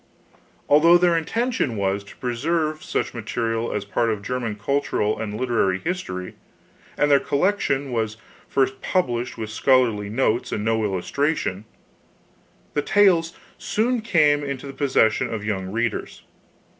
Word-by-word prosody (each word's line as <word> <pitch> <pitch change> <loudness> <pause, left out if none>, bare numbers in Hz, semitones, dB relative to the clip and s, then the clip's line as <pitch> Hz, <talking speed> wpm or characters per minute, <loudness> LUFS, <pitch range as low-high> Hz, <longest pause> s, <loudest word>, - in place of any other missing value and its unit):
Although 165 +4 +6
their 175 -1 +3
intention 165 - -1
was 100 0 -1
to - - -14
preserve 155 +5 -1
such - - -2
material 115 0 -2
as 105 -1 -3
part 115 +3 0
of 105 -2 -2
German 120 -2 -3
cultural 110 -2 -1
and 105 -1 -4
literary 115 -7 +1
history, 95 - -4 0.6
and 145 0 +2
their 140 - +6
collection 140 -5 0
was 110 -2 -2 0.3
first 130 -1 0
published 125 -11 -1
with 110 -1 -5
scholarly 115 -4 +2
notes 120 +1 0
and 105 - -2
no 110 0 +1
illustration, 105 - -1 1.1
the 145 - +1
tales 180 -3 +3 0.3
soon 235 +2 0
came 150 -8 +3
into 140 -1 -5
the 135 - -7
possession 135 -5 +2
of 110 -2 -4
young 95 -3 -2
readers. 115 +1 -3
125 Hz, 135 wpm, -23 LUFS, 110-150 Hz, 1.1 s, Although